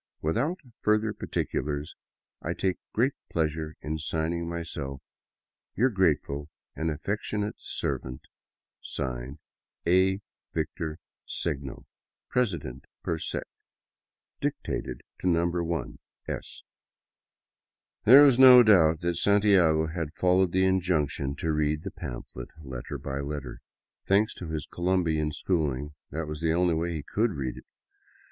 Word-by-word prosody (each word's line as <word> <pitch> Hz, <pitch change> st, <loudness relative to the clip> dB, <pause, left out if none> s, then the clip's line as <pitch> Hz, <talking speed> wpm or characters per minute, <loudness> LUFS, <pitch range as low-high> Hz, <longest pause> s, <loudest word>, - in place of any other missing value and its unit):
Without 125 Hz, -, 0 dB, 0.2 s
further 105 Hz, 0 st, +2 dB
particulars, 75 Hz, -6 st, -3 dB, 0.5 s
etc., -, -, -3 dB
I -, -, -6 dB
take 95 Hz, -1 st, +1 dB
great 130 Hz, +5 st, +2 dB, 0.2 s
pleasure 80 Hz, -1 st, -1 dB
in 80 Hz, +1 st, -3 dB
signing 80 Hz, +2 st, -1 dB
myself 75 Hz, -5 st, -5 dB, 0.8 s
Your 130 Hz, +3 st, +3 dB
grateful 75 Hz, -6 st, +1 dB, 0.3 s
and 80 Hz, +1 st, -1 dB
affectionate 105 Hz, +6 st, -2 dB
servant, 65 Hz, 0 st, -4 dB, 0.6 s
(Signed) 65 Hz, 0 st, -4 dB, 0.5 s
A. 95 Hz, +2 st, +4 dB, 0.4 s
Victor 80 Hz, -1 st, -2 dB, 0.3 s
Segno, 70 Hz, -5 st, -4 dB, 0.4 s
President 85 Hz, -, -1 dB, 0.2 s
per 80 Hz, -1 st, -1 dB
Sec. -, -, -2 dB, 1.0 s
Dictated -, -, -3 dB, 0.2 s
to -, -, -2 dB
No. 85 Hz, -1 st, +3 dB
1 85 Hz, -5 st, -2 dB, 0.3 s
S. -, -, -5 dB, 1.4 s
There 135 Hz, +6 st, +10 dB
was 135 Hz, -3 st, +6 dB
no 125 Hz, -2 st, +10 dB
doubt 85 Hz, -8 st, +5 dB
that 85 Hz, -1 st, 0 dB
Santiago 95 Hz, -6 st, +4 dB
had 80 Hz, -1 st, -4 dB
followed 90 Hz, 0 st, +3 dB
the 95 Hz, +1 st, +3 dB
injunction 80 Hz, -7 st, +1 dB
to 80 Hz, +2 st, -1 dB
read 75 Hz, 0 st, 0 dB
the -, -, -5 dB
pamphlet -, -, -7 dB
letter 65 Hz, -3 st, -6 dB
by 65 Hz, +1 st, -4 dB
letter. 70 Hz, -3 st, -5 dB, 0.5 s
Thanks 105 Hz, +3 st, +3 dB
to 90 Hz, -, -8 dB
his 80 Hz, -2 st, -3 dB
Colombian 85 Hz, -4 st, 0 dB
school 80 Hz, -2 st, 0 dB
ing, 70 Hz, +4 st, -5 dB, 0.2 s
that 80 Hz, +2 st, -3 dB
was 75 Hz, 0 st, -6 dB
the 80 Hz, -1 st, +2 dB
only 90 Hz, 0 st, +3 dB
way 85 Hz, +2 st, -1 dB
he 80 Hz, -3 st, -4 dB
could 110 Hz, +5 st, 0 dB
read 65 Hz, -4 st, -3 dB
it. -, -, -11 dB
80 Hz, 125 wpm, -28 LUFS, 75-95 Hz, 1.4 s, There